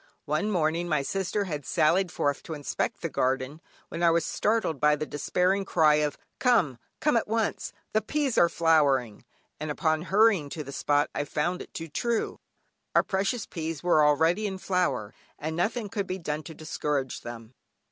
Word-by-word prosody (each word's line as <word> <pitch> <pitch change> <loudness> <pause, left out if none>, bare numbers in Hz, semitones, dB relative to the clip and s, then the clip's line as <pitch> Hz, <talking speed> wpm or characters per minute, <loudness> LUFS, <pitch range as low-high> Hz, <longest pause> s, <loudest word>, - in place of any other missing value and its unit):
One 155 +8 0
morning, 170 -2 0
my 150 -3 +1
sister 195 +5 -1
had 150 -7 -4
sallied 175 +7 +2
forth 145 -1 -1
to 160 - -6
inspect 145 -2 -3
the - - +1
garden, 130 +4 -1 0.3
when 165 - -5
I 170 - +5
was 165 0 +2
startled 215 -9 0
by 150 +1 +4
the 155 - -3
despairing 180 +6 0
cry 155 -5 +4
of 150 -1 0 0.2
"Come, 200 - +3 0.2
come 300 -4 +2
at - - 0
once, 225 0 -1 0.2
the 215 - +3
peas 285 -2 -1
are 170 - +5
flowering;" 140 -10 +2 0.3
and 155 +1 -4
upon 155 +1 +1
hurrying 195 -4 +3
to 155 +1 -5
the 140 - -8
spot 145 +1 +1
I - - -1
found 170 +5 -2
it - - -10
too 165 - -5
true; 225 +10 -1 0.6
our - - +6
precocious 200 +4 -1
peas 160 -3 -5
were 170 -4 +4
already 160 +8 +3
in 190 -1 -4
flower, 175 - -1 0.2
and 155 +2 -4
nothing 210 +6 -1
could 200 -1 -3
be 185 - -3
done 155 -4 -3
to 160 - -9
discourage 150 -4 -2
them. 115 0 -9
160 Hz, 180 wpm, -27 LUFS, 150-195 Hz, 0.6 s, our